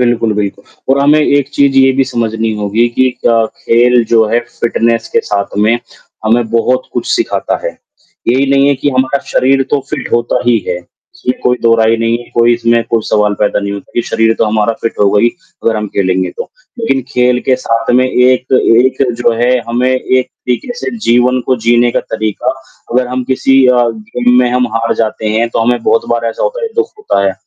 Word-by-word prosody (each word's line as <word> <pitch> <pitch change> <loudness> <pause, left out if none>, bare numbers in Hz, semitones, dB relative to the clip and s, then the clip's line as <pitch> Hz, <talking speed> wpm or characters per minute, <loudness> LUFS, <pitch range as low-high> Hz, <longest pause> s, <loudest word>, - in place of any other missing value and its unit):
बिल्कुल, 120 -2 +1
बिल्कुल। 100 -1 -3 0.3
और 140 - 0
हमें 150 +2 +4
एक 145 -2 +1
चीज़ 140 -1 +2
ये 135 0 +5
भी 135 +1 +1
समझनी 115 -3 -2
होगी 105 +3 0
कि 130 +2 +1 0.2
क 115 -1 +3 0.2
खेल 120 +1 +3
जो 115 -1 +4
है, 115 - +2
फिटनेस 115 -1 -1
के - - +3
साथ 100 -1 -3
में 110 +3 +2 0.5
हमें, 115 +2 +2
बहुत 125 +2 0
कुछ 120 - -3
सिखाता 345 - -1
है। - - -1 0.6
यही 130 +3 +2
नहीं 140 0 +3
है 140 - +3
कि 145 +2 -1
हमारा 130 +1 0
शरीर 135 +1 +2
तो 145 - +1
फिट 140 -5 -5
होता 120 0 +1
ही 120 -2 +4
है। 90 - -1 0.4
इसमें 130 -8 -3
कोई 125 0 +2
दोहराई 115 -1 +3
नहीं 115 0 0
है, 120 - -13
कोई 120 0 +4
इसमें 115 0 +1
कोई 115 -1 +1
सवाल 105 -1 +1
पैदा 105 - +1
नहीं 100 0 -3
होता 100 - -8
कि 120 - +1
शरीर 115 0 +1
तो - - +3
हमारा 110 +1 0
फिट 115 - -1
होगा 100 0 +3
ही, 120 - +4 0.4
अगर 115 -1 +1
हम 105 0 -3
खेलेंगे 95 -2 0
तो। - - -4 0.3
लेकिन 135 - 0
खेल 125 0 +1
के 130 - +4
साथ 115 -2 -1
में 130 +1 +4
एक 130 0 +1
एक 130 +1 +3 0.2
जो 120 - +3
है 125 +1 +3 0.2
हमें 120 +2 0
एक 130 0 0
तरीके 125 - -4
से 240 - -4
जीवन 125 +2 +3
को 130 - +2
जीने 120 0 +4
का - - 0
तरीका, 110 +3 -3 0.4
अगर 125 +1 +1
हम 125 0 -3
किसी 135 +1 +2
अ, 125 -1 +4
गेम 120 +3 -1
में 125 -1 +2
हम 125 0 +1
हार 115 0 0
जाते 110 -1 -2
हैं, 115 +2 0
तो - - -3
हमें 120 +1 0
बहुत 115 - +1
बार 120 0 0
ऐसा - - -6
होता - - -2
है, 460 - -1
दुःख 450 0 +1
होता 425 - 0
है। 95 - +1
120 Hz, 210 wpm, -12 LUFS, 115-130 Hz, 0.6 s, ये